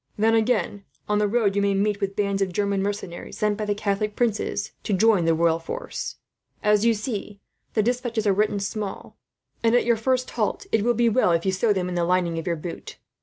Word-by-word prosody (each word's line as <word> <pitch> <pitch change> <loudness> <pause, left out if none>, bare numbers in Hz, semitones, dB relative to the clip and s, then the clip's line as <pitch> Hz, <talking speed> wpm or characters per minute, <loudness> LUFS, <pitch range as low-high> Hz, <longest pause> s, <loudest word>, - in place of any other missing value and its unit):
"Then 220 +2 +3
again, 215 -3 +1 0.2
on 210 0 +1
the 210 - +2
road 205 -2 +1
you 200 - +2
may 200 0 +2
meet 205 +1 0
with 195 0 -2
bands 200 -1 0
of 190 -2 0
German 200 +1 0
mercenaries, 200 -3 -4
sent 210 -1 +1
by 215 0 -3
the 205 0 0
Catholic 210 0 -1
princes 215 -3 -1
to 210 - -2
join 195 -2 +4
the 165 0 +3
royal 165 0 +2
forces. - - -5 0.5
As 210 0 +3
you 230 -1 +4
see, 210 -2 -5 0.4
the 215 - +3
despatches 240 -2 -1
are 200 - +4
written 205 +1 +1
small 200 0 -5 0.4
and, 230 +1 +3
at 245 - +3
your 235 -1 +3
first 255 +3 0
halt, - - -1
it 220 - +3
will 240 +3 +2
be 235 +1 +3
well 225 -6 +3
if 165 +1 0
you 190 - +2
sew 200 +4 +1
them 185 -3 0
in 180 - -4
the 175 -1 0
lining 175 -1 +1
of 165 - -7
your 170 - +1
boot. 165 +2 -8
205 Hz, 225 wpm, -24 LUFS, 195-225 Hz, 0.5 s, join